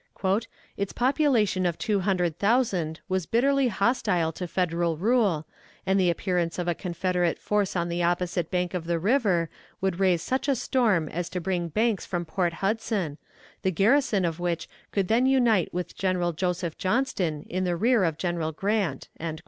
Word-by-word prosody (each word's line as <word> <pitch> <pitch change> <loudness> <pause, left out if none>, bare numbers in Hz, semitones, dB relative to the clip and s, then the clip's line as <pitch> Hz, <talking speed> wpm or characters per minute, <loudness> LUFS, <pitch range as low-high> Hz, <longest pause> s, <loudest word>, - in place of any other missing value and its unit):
"Its 200 -1 -2
population 245 -8 +2
of 175 -2 0
two 210 -2 0
hundred 180 -4 0
thousand 200 -8 +1
was 185 -3 -1
bitterly 275 +3 +3
hostile 200 -6 +1
to 180 +2 -5
Federal 170 -2 0
rule, 200 -5 +2 0.4
and 190 +1 +2
the 180 -2 +3
appearance 175 -1 -1
of 175 -1 -2
a 175 - +2
Confederate 180 0 -1
force 205 -2 0
on 170 -1 0
the 170 0 -2
opposite 175 -1 0
bank 180 -1 -1
of 180 -3 -3
the 170 0 0
river 195 -3 +2 0.3
would 190 -2 -1
raise 185 -4 +2
such 260 +2 -1
a 280 - +3
storm 220 -10 +1
as 175 0 -3
to 180 - -3
bring 175 -1 -1
Banks 215 +4 0
from 175 -2 -2
Port 175 0 -1
Hudson, 200 -7 -1 0.4
the 190 - +1
garrison 205 - +3
of 165 0 -2
which 170 -2 -2 0.2
could 195 -3 0
then 235 +5 +3
unite 240 -8 +3
with 175 -1 -4
General 180 -2 0
Joseph 175 -1 -2
Johnston 185 - 0
in 185 +2 -2
the 175 -1 0
rear 230 +3 +3
of 160 -3 0
General 170 -3 -1
Grant." 195 -4 -1
185 Hz, 170 wpm, -26 LUFS, 170-210 Hz, 0.4 s, bitterly